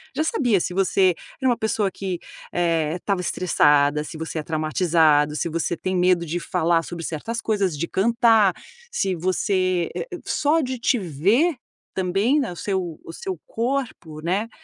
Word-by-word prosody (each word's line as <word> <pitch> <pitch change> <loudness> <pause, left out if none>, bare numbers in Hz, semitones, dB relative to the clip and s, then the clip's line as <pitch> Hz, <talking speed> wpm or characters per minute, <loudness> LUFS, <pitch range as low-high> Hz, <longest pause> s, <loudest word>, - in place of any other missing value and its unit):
Já 310 - +1
sabia 245 - +2
se 180 - -3
você 190 -1 +3 0.3
era 260 - +3
uma 240 - +2
pessoa 215 -2 0
que, 185 -3 -4 0.3
eh, 165 -2 +1
estava 190 0 -1
estressada, 150 -5 +3
se 155 - -8
você 160 0 -4
é - - -4
traumatizado, 155 -2 +2
se 170 - -1
você 170 +1 -1
tem 185 0 -2
medo 180 -1 +3
de 170 +3 -2
falar 165 0 +1
sobre 170 -1 -7
certas 225 +9 -4
coisas, 200 -7 0
de 170 +3 -2
cantar, 225 -2 +4 0.4
se 190 - 0
você, 185 0 0
eh - - -3
eh, - - -5
só 310 +3 +2
de 255 -1 -3
te 240 0 +2
ver, 200 - +2 0.4
também, 195 +10 +2
né, 240 - -3
o - - -8
seu 185 -5 -3
o 165 - -8
seu 185 -2 -5
corpo, 230 - -3
né 195 +7 -1
185 Hz, 170 wpm, -23 LUFS, 165-220 Hz, 0.4 s, cantar